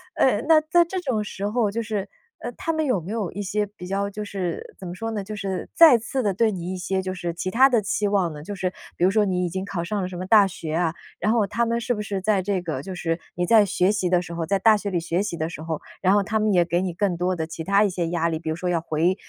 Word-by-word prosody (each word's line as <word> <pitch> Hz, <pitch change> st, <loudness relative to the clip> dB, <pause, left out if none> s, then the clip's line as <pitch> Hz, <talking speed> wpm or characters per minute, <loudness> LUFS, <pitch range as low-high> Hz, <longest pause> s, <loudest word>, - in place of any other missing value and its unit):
呃， 220 Hz, -5 st, +3 dB
那 320 Hz, -1 st, +7 dB
在 315 Hz, +3 st, +3 dB
这 370 Hz, +3 st, -4 dB
种 255 Hz, -11 st, -1 dB
时 200 Hz, -1 st, -4 dB
候， 215 Hz, -1 st, +1 dB
就 230 Hz, +3 st, -2 dB
是， 210 Hz, -3 st, -3 dB, 0.3 s
呃， 240 Hz, -, -5 dB
他 330 Hz, -, -2 dB
们 315 Hz, -1 st, 0 dB
有 255 Hz, -9 st, +1 dB
没 170 Hz, +4 st, -7 dB
有 215 Hz, -6 st, -2 dB
一 205 Hz, -, -5 dB
些 210 Hz, +1 st, -1 dB
比 200 Hz, -3 st, -11 dB
较 200 Hz, +1 st, -1 dB
就 210 Hz, +1 st, -6 dB
是 200 Hz, -, -5 dB
怎 185 Hz, -, -7 dB
么 175 Hz, -, -5 dB
说 225 Hz, +4 st, -4 dB
呢， 210 Hz, -3 st, -3 dB
就 210 Hz, +2 st, -6 dB
是 195 Hz, -2 st, -4 dB
再 325 Hz, -6 st, +9 dB
次 255 Hz, +3 st, -3 dB
地 205 Hz, -2 st, +1 dB
对 220 Hz, +3 st, +2 dB
你 180 Hz, -1 st, -4 dB
一 -, -, -4 dB
些 190 Hz, +1 st, -1 dB
就 185 Hz, 0 st, -4 dB
是 175 Hz, -2 st, -4 dB
其 185 Hz, +2 st, -3 dB
他 260 Hz, +5 st, +6 dB
的 240 Hz, -4 st, +3 dB
期 205 Hz, +1 st, 0 dB
望 190 Hz, -5 st, +1 dB
呢？ 150 Hz, -, -8 dB
就 205 Hz, +5 st, -6 dB
是 185 Hz, -1 st, -2 dB, 0.3 s
比 -, -, -1 dB
如 190 Hz, -, +4 dB
说 210 Hz, 0 st, +3 dB
你 180 Hz, -2 st, 0 dB
已 -, -, -2 dB
经 190 Hz, +2 st, -3 dB
考 195 Hz, -3 st, -3 dB
上 205 Hz, +4 st, -2 dB
了 180 Hz, -, -2 dB
什 180 Hz, -1 st, -7 dB
么 185 Hz, -, -4 dB
大 205 Hz, 0 st, +6 dB
学 160 Hz, -4 st, -6 dB
啊， 165 Hz, -1 st, +1 dB, 0.3 s
然 215 Hz, -, +1 dB
后 225 Hz, -3 st, +3 dB
他 230 Hz, +4 st, 0 dB
们 235 Hz, 0 st, 0 dB
是 240 Hz, +1 st, -1 dB
不 210 Hz, -, -4 dB
是 200 Hz, -2 st, -3 dB
在 200 Hz, 0 st, +1 dB
这 190 Hz, 0 st, -1 dB
个 155 Hz, -6 st, -3 dB
就 185 Hz, +5 st, -7 dB
是 165 Hz, -1 st, -2 dB, 0.2 s
你 175 Hz, -, 0 dB
在 220 Hz, +3 st, +6 dB
学 185 Hz, -1 st, +2 dB
习 200 Hz, -4 st, 0 dB
的 180 Hz, -1 st, +3 dB
时 170 Hz, -, -8 dB
候 170 Hz, 0 st, -3 dB
在 195 Hz, -, +2 dB
大 215 Hz, +3 st, +5 dB
学 205 Hz, -1 st, -3 dB
里 180 Hz, -3 st, 0 dB
学 170 Hz, +2 st, -1 dB
习 200 Hz, -4 st, -3 dB
的 160 Hz, +1 st, -2 dB
时 155 Hz, -, -8 dB
候， 160 Hz, -1 st, -3 dB, 0.2 s
然 190 Hz, +1 st, +4 dB
后 205 Hz, -, +3 dB
他 220 Hz, +2 st, -1 dB
们 215 Hz, 0 st, +2 dB
也 175 Hz, -3 st, +4 dB
给 175 Hz, +1 st, 0 dB
你 185 Hz, -2 st, -2 dB
更 185 Hz, 0 st, 0 dB
多 180 Hz, +2 st, 0 dB
的 160 Hz, -2 st, -2 dB
其 160 Hz, 0 st, -7 dB
他 200 Hz, +4 st, +3 dB
一 205 Hz, -, +2 dB
些 175 Hz, -2 st, -2 dB
压 170 Hz, 0 st, 0 dB
力， 160 Hz, -1 st, -2 dB
比 160 Hz, -1 st, -5 dB
如 160 Hz, -, -1 dB
说 180 Hz, +2 st, -3 dB
要 170 Hz, -2 st, +1 dB
回， 165 Hz, +3 st, +1 dB
195 Hz, 335 characters per minute, -24 LUFS, 175-215 Hz, 0.3 s, 再